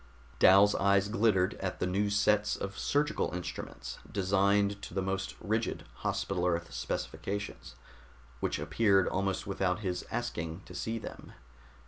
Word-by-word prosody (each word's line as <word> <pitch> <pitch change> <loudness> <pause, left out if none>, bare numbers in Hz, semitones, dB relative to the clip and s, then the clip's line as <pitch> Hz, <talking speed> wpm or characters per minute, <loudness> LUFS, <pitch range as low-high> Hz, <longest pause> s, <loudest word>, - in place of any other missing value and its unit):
Dal's 100 +2 +7
eyes 100 0 +3
glittered 105 -4 +3
at 95 -1 -3
the - - +1
new 100 +3 +1
sets 105 +1 +2
of 100 0 -5
surgical 150 - 0
instruments, 90 - -6
designed 100 +1 +2
to 90 - -8
the 95 - +1
most 95 0 -2
rigid 110 +2 -1
Hospital 90 -2 -1
Earth 85 -1 -1
specifications, 100 +1 -4 0.6
which - - -1
appeared 100 -5 +3
almost 95 0 -1
without 95 -1 0
his 90 -3 -2
asking 85 -7 -3
to - - -11
see 115 +1 -2
them. - - -9
100 Hz, 135 wpm, -31 LUFS, 95-105 Hz, 0.6 s, Dal's